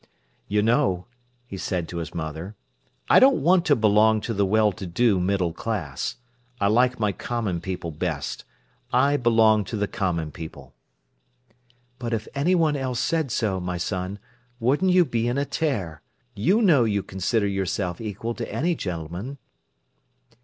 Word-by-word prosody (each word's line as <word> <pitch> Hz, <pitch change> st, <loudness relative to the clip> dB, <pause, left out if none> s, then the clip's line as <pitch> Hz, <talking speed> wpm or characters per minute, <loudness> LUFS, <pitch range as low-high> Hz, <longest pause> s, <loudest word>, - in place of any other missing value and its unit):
"You 105 Hz, 0 st, +1 dB
know," 115 Hz, -6 st, +2 dB, 0.4 s
he 100 Hz, -5 st, -8 dB
said 90 Hz, -3 st, -2 dB
to 85 Hz, -, -5 dB
his 85 Hz, -1 st, -4 dB
mother, 80 Hz, +5 st, -5 dB, 0.5 s
"I -, -, +7 dB
don't 260 Hz, -, +5 dB
want 175 Hz, +2 st, +4 dB
to 145 Hz, -, +4 dB
belong 110 Hz, -1 st, +4 dB
to 115 Hz, -, -3 dB
the 100 Hz, -1 st, +1 dB
well 105 Hz, +1 st, +3 dB
to 95 Hz, -1 st, -7 dB
do 100 Hz, +3 st, +2 dB
middle 90 Hz, -2 st, 0 dB
class. 85 Hz, -, -3 dB, 0.4 s
I 100 Hz, -, +2 dB
like 125 Hz, +3 st, +3 dB
my 105 Hz, -2 st, +1 dB
common 100 Hz, -4 st, -3 dB
people 90 Hz, -2 st, -4 dB
best. 80 Hz, -2 st, -3 dB, 0.5 s
I 140 Hz, +3 st, +3 dB
belong 110 Hz, -4 st, +4 dB
to 110 Hz, -, -4 dB
the 105 Hz, 0 st, 0 dB
common 85 Hz, -6 st, -2 dB
people." 80 Hz, -1 st, -10 dB, 1.3 s
"But 120 Hz, -1 st, -3 dB
if 110 Hz, 0 st, -2 dB
anyone 160 Hz, +1 st, +2 dB
else 130 Hz, -3 st, -2 dB
said 160 Hz, -4 st, 0 dB
so, 105 Hz, -5 st, 0 dB
my 90 Hz, 0 st, -3 dB
son, 95 Hz, +2 st, -3 dB, 0.4 s
wouldn't 140 Hz, +10 st, +2 dB
you 180 Hz, -1 st, +5 dB
be 115 Hz, -4 st, -1 dB
in 120 Hz, +2 st, 0 dB
a 140 Hz, -, +1 dB
tear. 100 Hz, -, -2 dB, 0.3 s
You 185 Hz, -, +2 dB
know 155 Hz, -, +5 dB
you 100 Hz, -3 st, 0 dB
consider 100 Hz, +4 st, -1 dB
yourself 95 Hz, -2 st, -2 dB
equal 110 Hz, +2 st, -4 dB
to -, -, -6 dB
any 170 Hz, +5 st, 0 dB
gentleman." 90 Hz, -, -5 dB
105 Hz, 160 wpm, -24 LUFS, 90-125 Hz, 1.3 s, I